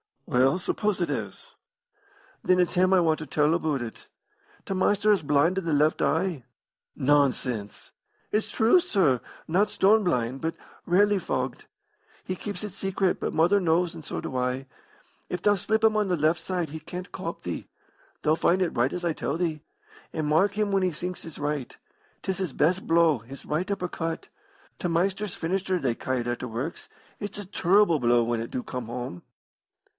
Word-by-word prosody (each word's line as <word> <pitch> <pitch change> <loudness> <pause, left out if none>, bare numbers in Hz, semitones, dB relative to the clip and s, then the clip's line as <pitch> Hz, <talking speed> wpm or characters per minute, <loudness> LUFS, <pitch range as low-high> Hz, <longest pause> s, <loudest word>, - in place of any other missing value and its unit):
"Well, 130 +6 +3
suppose 205 +2 -1
it 175 - 0
is?" - - -5 0.9
"Then 185 0 +3
it's 180 - +2
him 185 +1 +4
I 185 - +5
want 160 -2 +2
to 155 - -6
tell 150 +3 +2
aboot 155 -5 0
it. 115 -2 -8 0.6
T' - - -2
Maister 205 +2 +3
is 200 -4 +3
blind 150 +5 +2
o' - - -4
the 165 -3 -1
left 150 +2 +3
eye." 165 -11 0 0.5
"Nonsense!" 130 -6 0 0.4
"It's 215 +1 0
true, 230 +11 +4
sir. 170 - +2 0.3
Not 195 +6 +2
stone 210 +2 +4
blind, 125 -5 0
but 160 +2 -2 0.3
rarely 200 +3 +4
fogged. - - -3 0.6
He 185 - -3
keeps 200 -1 -5
it 210 - -3
secret, 195 -1 -1
but - - -2
mother 175 +6 +4
knows, 175 -1 +2
and 160 - -10
so - - -4
do 130 - -5
I. 125 +1 -1 0.6
If 180 - -3
thou 205 - +4
slip 220 +3 0
him 220 -1 +4
on 210 -1 +2
the 180 - +1
left 160 +1 +2
side 175 -1 -2
he 160 +2 -6
can't 180 +5 -8
cop - - -6
thee. - - -5 0.6
Thou'll 155 +1 +3
find 180 +3 +2
it 180 - +2
right 120 +3 +2
as 180 - -4
I 170 - +2
tell 160 - -2
thee. 165 -4 -1 0.5
And 155 - -2
mark 190 +7 +3
him 210 -1 +1
when 195 -1 +2
he 185 -2 +1
sinks 180 +3 -5
his 165 - -9
right. 145 -3 -3 0.5
'Tis 190 - -2
his 180 -8 -2
best 180 +5 +1
blow, 165 -4 +4
his 130 +5 -11
right 165 +6 -1
upper 195 -3 -2
cut. 165 -1 -4 0.5
T' - - -1
Maister's 190 +4 0
finisher, 185 +2 -1
they 135 -8 0
ca' 130 - -4
it 120 - -5
at 120 0 -2
t' - - -4
works. 125 +9 -5 0.3
It's 205 0 -5
a 205 - -6
turble 185 -2 +3
blow 120 -1 +4
when 115 0 -1
it 115 - -5
do 125 - -3
come 125 -2 -5
home." 120 -6 -6
170 Hz, 190 wpm, -26 LUFS, 145-190 Hz, 0.9 s, I